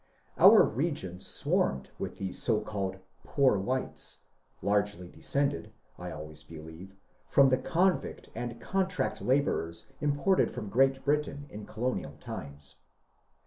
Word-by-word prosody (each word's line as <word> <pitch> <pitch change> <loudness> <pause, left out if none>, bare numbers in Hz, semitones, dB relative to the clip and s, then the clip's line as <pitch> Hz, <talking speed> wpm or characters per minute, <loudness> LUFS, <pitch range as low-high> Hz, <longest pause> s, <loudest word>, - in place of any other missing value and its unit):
Our - - +9
region 120 - -2
swarmed 65 -7 0
with - - -4
those 95 -1 -3 0.2
called 95 -3 -3 0.3
*^poor 130 -9 +3
whites," 130 +6 -2 0.4
largely 100 -3 0
descended, 140 +9 -1 0.3
I - - -5
always 75 0 -8
believe, 80 +4 -11 0.3
from 135 -1 +6
the 130 0 +3
convict 175 +7 0
and 120 0 -5
contract 190 - -1
labourers 100 -9 0
imported 150 +6 +2
from 110 -5 -6
Great 135 +4 +3
Britain 145 -1 0
in 105 0 -8
colonial 110 - -2
times. 75 -2 -8
110 Hz, 115 wpm, -30 LUFS, 90-140 Hz, 0.4 s, Our